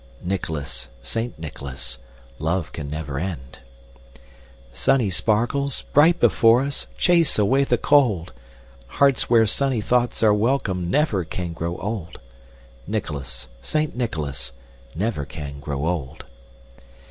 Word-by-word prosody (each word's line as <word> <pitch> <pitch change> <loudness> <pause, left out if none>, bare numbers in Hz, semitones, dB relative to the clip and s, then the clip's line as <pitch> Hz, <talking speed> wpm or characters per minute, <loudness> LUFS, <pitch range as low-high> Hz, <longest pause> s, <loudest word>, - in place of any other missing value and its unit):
Nicholas! 80 -8 -3 0.2
Saint 115 +1 -3
Nicholas! 70 -5 -7 0.4
Love 80 +2 -1
can 75 -3 -6
never 70 -2 -4
end. 70 -7 -5 1.1
Sunny 105 - +2
sparkles, 120 +8 0
bright 165 +4 +6
before 115 +1 +5
us, 140 +1 -3
Chase 170 -4 +3
away 130 +7 +3
the - - +2
cold! 105 - +3 0.6
Hearts 140 -3 +4
where 115 -2 +6
sunny 130 +3 +1
thoughts 120 +2 +1
are 105 -1 +6
welcome, 105 -6 0
Never 105 - +2
can 85 0 -5
grow 85 +1 -3
old. 95 -4 -5 0.7
Nicholas! 70 - -4
Saint 155 - -1
Nicholas! 75 - -3 0.4
Never 100 -4 -1
can 70 0 -7
grow 70 0 -3
old! 80 -6 -3
95 Hz, 115 wpm, -23 LUFS, 75-120 Hz, 1.1 s, bright